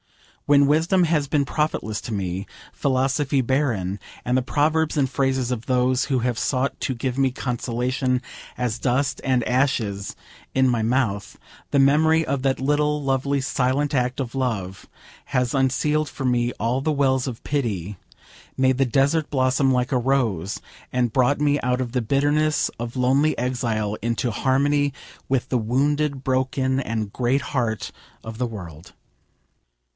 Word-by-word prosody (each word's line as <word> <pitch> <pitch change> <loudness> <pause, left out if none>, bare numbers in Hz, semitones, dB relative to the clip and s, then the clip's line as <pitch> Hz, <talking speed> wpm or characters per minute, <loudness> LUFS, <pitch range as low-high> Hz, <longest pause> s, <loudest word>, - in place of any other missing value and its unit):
When 145 -1 +6
wisdom 165 +5 +3
has 155 -3 +1
been 145 0 +1
profitless 130 -9 -2
to - - -7
me, 95 -1 -3 0.3
philosophy 135 +1 +1
barren, 115 -8 0 0.3
and 125 - +1
the 130 - +3
proverbs 155 +4 +1
and 135 -2 +3
phrases 135 -1 0
of 120 -2 -4
those 125 0 +2
who 135 -3 0
have 120 -1 -1
sought 135 0 0
to 130 - -1
give 125 +2 -3
me 135 -1 +3
consolation 125 +1 -1 0.4
as 120 -2 -2
dust 135 +2 0
and 130 -3 +1
ashes 120 -7 0 0.4
in 130 0 +4
my 120 -3 +1
mouth, 110 -4 -1 0.3
the 140 - +2
memory 160 +4 +4
of 140 -1 -1
that 135 0 0
little, 150 +2 +1
lovely, 140 +1 0
silent 135 +2 0
act 125 -1 0
of 125 -3 -3
love 100 -8 -3 0.4
has 125 -3 0
unsealed 145 +3 +1
for 135 - -6
me 120 -1 +1
all 120 +5 -1
the 155 - 0
wells 135 -2 +1
of 120 -3 -5
pity: 105 - -2 0.6
made 130 -1 +3
the 135 - +4
desert 140 +5 +1
blossom 130 0 +2
like 125 +1 0
a - - +3
rose, 115 -8 0 0.3
and 120 -3 0
brought 130 +3 +3
me 145 0 +2
out 125 0 0
of 125 -2 -3
the 125 - +1
bitterness 145 +4 +1
of 120 +2 -5
lonely 135 +5 +2
exile 115 -4 -1
into 115 +1 -1
harmony 140 +4 +1 0.4
with 135 -2 0
the 125 - 0
wounded, 140 +4 0
broken, 130 0 0
and 110 -4 -3
great 130 +3 +1
heart 115 -5 -1 0.3
of 110 0 -7
the 125 - 0
world. 90 -7 -9
130 Hz, 155 wpm, -23 LUFS, 120-140 Hz, 0.6 s, When